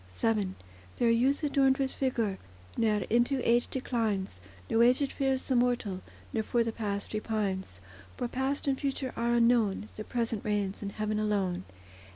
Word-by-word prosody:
VII 210 Hz, -4 st, +1 dB, 0.4 s
There 235 Hz, -1 st, +3 dB
youth 260 Hz, +6 st, +2 dB
adorned 275 Hz, -2 st, +3 dB
with 270 Hz, -1 st, -1 dB
vigour 230 Hz, -7 st, -1 dB, 0.4 s
Ne'er 215 Hz, -3 st, +1 dB
into 240 Hz, +4 st, +3 dB
age 240 Hz, +1 st, +4 dB
declines; 215 Hz, -, -2 dB, 0.3 s
No 225 Hz, -, +3 dB
aged 255 Hz, +4 st, +4 dB
fears 270 Hz, -2 st, 0 dB
the 260 Hz, -, 0 dB
mortal, 240 Hz, -6 st, +1 dB, 0.3 s
Nor 225 Hz, -, +1 dB
for 235 Hz, +2 st, +1 dB
the 230 Hz, -, -2 dB
past 205 Hz, -3 st, -3 dB
repines; 200 Hz, -, -2 dB, 0.4 s
For 245 Hz, -, -1 dB
past 265 Hz, +3 st, -1 dB
and 270 Hz, -1 st, +1 dB
future 270 Hz, -2 st, -2 dB
are 235 Hz, +1 st, +1 dB
unknown: 230 Hz, -3 st, +3 dB
The 215 Hz, -, -4 dB
present 230 Hz, -2 st, -2 dB
reigns 205 Hz, -2 st, -1 dB
in 200 Hz, -, -3 dB
heaven 215 Hz, +1 st, -2 dB
alone. 195 Hz, -4 st, 0 dB
230 Hz, 160 wpm, -30 LUFS, 210-255 Hz, 0.4 s, age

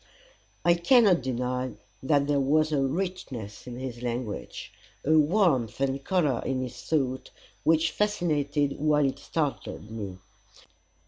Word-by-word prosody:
I 170 Hz, -, +6 dB
cannot 185 Hz, +1 st, +5 dB
deny 125 Hz, 0 st, -2 dB, 0.3 s
that 140 Hz, +1 st, +2 dB
there 145 Hz, -1 st, +1 dB
was 155 Hz, +3 st, +2 dB
a 145 Hz, -2 st, +2 dB
richness 135 Hz, -, -4 dB
in 120 Hz, -1 st, -6 dB
his 125 Hz, -2 st, -6 dB
language, 120 Hz, -3 st, -5 dB, 0.3 s
a 150 Hz, -, +2 dB
warmth 155 Hz, -, +3 dB
and 135 Hz, 0 st, -1 dB
colour 155 Hz, -10 st, +1 dB
in 130 Hz, -1 st, -1 dB
his 125 Hz, -1 st, -7 dB
thought, 130 Hz, -5 st, -1 dB, 0.3 s
which 165 Hz, 0 st, +3 dB
fascinated 150 Hz, -8 st, 0 dB
while 150 Hz, -1 st, +3 dB
it 135 Hz, -, -1 dB
startled 145 Hz, -8 st, -3 dB
me. 100 Hz, -5 st, -6 dB
140 Hz, 130 wpm, -27 LUFS, 125-160 Hz, 0.3 s, I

